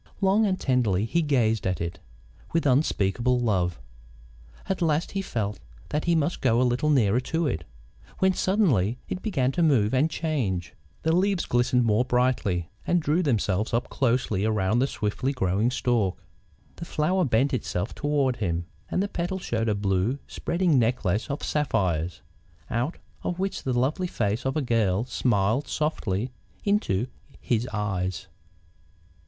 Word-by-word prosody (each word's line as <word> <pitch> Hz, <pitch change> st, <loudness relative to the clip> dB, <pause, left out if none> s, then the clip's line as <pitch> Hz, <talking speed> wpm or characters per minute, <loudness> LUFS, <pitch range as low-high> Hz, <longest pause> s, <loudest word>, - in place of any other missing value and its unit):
Long 200 Hz, +2 st, +3 dB
and 185 Hz, -1 st, 0 dB
tenderly 110 Hz, -7 st, +1 dB
he 170 Hz, +9 st, +1 dB
gazed 115 Hz, -, +1 dB
at 90 Hz, -3 st, -1 dB
it, 85 Hz, +2 st, -4 dB, 0.5 s
with 165 Hz, -1 st, +1 dB
unspeakable 125 Hz, -3 st, +2 dB
love. 90 Hz, -, 0 dB, 0.9 s
At 190 Hz, -, -2 dB
last 160 Hz, 0 st, +1 dB
he 195 Hz, -, -1 dB
felt 105 Hz, -, -3 dB, 0.3 s
that 150 Hz, -, -1 dB
he 170 Hz, -1 st, +3 dB
must 160 Hz, +2 st, 0 dB
go 115 Hz, +1 st, +3 dB
a -, -, +4 dB
little 125 Hz, +5 st, +1 dB
nearer 120 Hz, -6 st, +3 dB
to 160 Hz, +6 st, -1 dB
it, 85 Hz, -, -2 dB, 0.5 s
when 190 Hz, 0 st, +3 dB
suddenly 145 Hz, -, +2 dB
it 185 Hz, -, -4 dB
began 135 Hz, -, 0 dB
to 175 Hz, -, -1 dB
move 130 Hz, -10 st, +3 dB
and 140 Hz, +5 st, +3 dB
change. 110 Hz, -, -2 dB, 0.3 s
The 160 Hz, +1 st, +2 dB
leaves 190 Hz, 0 st, +2 dB
glistened 125 Hz, 0 st, +2 dB
more 110 Hz, +1 st, +3 dB
brightly, 125 Hz, -9 st, 0 dB, 0.2 s
and 175 Hz, -, +3 dB
drew 160 Hz, +2 st, +1 dB
themselves 110 Hz, -, 0 dB
up 120 Hz, -, -1 dB
closely 120 Hz, -6 st, +1 dB
around 110 Hz, 0 st, +1 dB
the 135 Hz, -, +2 dB
swiftly 130 Hz, +4 st, -2 dB
growing 105 Hz, -1 st, +1 dB
stalk. 120 Hz, -7 st, 0 dB, 0.6 s
The 170 Hz, -, -6 dB
flower 180 Hz, +5 st, +1 dB
bent 135 Hz, +1 st, +2 dB
itself 100 Hz, -4 st, -2 dB
toward 145 Hz, -4 st, 0 dB
him, 85 Hz, -5 st, -1 dB, 0.2 s
and 190 Hz, -, +1 dB
the -, -, -1 dB
petals 180 Hz, 0 st, -3 dB
showed 115 Hz, -1 st, -1 dB
a 105 Hz, -, +1 dB
blue, 100 Hz, +5 st, 0 dB
spreading 170 Hz, -5 st, +1 dB
necklace 110 Hz, -4 st, 0 dB
of 140 Hz, -, -3 dB
sapphires, 90 Hz, -, 0 dB, 0.5 s
out 120 Hz, +8 st, -1 dB, 0.2 s
of 175 Hz, -, -3 dB
which 195 Hz, +1 st, -2 dB
the 130 Hz, -2 st, -1 dB
lovely 155 Hz, +9 st, 0 dB
face 110 Hz, -, -1 dB
of 135 Hz, -, -1 dB
a 150 Hz, -, 0 dB
girl 110 Hz, -4 st, +1 dB
smiled 120 Hz, 0 st, +1 dB
softly 125 Hz, -7 st, -1 dB, 0.3 s
into 200 Hz, -, +1 dB, 0.3 s
his 120 Hz, 0 st, 0 dB
eyes. 95 Hz, -3 st, -2 dB
125 Hz, 155 wpm, -26 LUFS, 105-155 Hz, 0.9 s, a